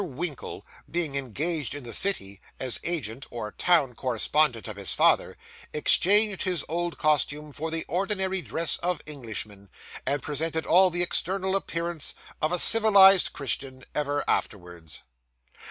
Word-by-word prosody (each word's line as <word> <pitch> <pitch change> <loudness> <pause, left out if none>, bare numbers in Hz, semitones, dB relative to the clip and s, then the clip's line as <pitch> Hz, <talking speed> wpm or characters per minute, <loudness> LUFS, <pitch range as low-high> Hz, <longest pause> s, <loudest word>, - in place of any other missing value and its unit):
Winkle, 150 -4 -6 0.2
being 170 -4 -1
engaged 140 +3 -3
in 145 - -8
the 120 -1 -7
city 100 - -1 0.2
as 130 -2 -1
agent 140 -7 -3
or 110 -3 -6
town 160 -8 +1
correspondent 125 +1 +1
of 110 - -7
his 100 -2 -3
father, - - +2 0.4
exchanged 200 +6 +4
his 180 -5 -1
old 175 +1 -3
costume 150 0 0
for 160 +3 -5
the 160 0 -2
ordinary 190 +1 -1
dress 165 -2 +2
of 175 -3 -2
Englishmen, 110 -8 -7 0.3
and 140 +1 -1
presented 160 +2 -2
all 185 +2 +5
the 175 0 0
external 190 +2 +1
appearance 170 -4 -1 0.3
of 155 - 0
a 180 - 0
civilised 200 -3 +6
Christian 135 -2 -4
ever 145 0 -1
afterwards. 85 -5 -4
155 Hz, 140 wpm, -26 LUFS, 130-175 Hz, 0.4 s, civilised